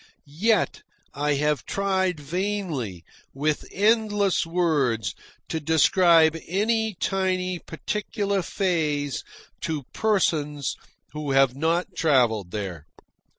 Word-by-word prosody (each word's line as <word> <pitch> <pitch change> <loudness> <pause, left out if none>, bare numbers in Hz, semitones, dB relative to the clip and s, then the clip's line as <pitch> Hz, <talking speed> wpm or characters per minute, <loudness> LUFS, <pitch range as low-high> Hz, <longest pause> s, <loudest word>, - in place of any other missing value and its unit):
Yet 195 +9 +1 0.3
I 145 +1 0
have 150 -1 0
tried 190 -3 0
vainly, 155 - -3 0.3
with 150 +2 -1
endless 205 -3 +2
words, 140 - +1 0.4
to 160 - -1
describe 160 +1 +4
any 220 +3 0
tiny 185 -2 0
particular 200 +3 -2
phase 155 -7 -1 0.4
to 155 -3 -3
persons 150 -10 0 0.4
who 150 -2 -3
have 135 -2 +4
not 165 +5 0
travelled 120 - +2
there. 90 -7 -5
160 Hz, 95 wpm, -25 LUFS, 140-190 Hz, 0.4 s, describe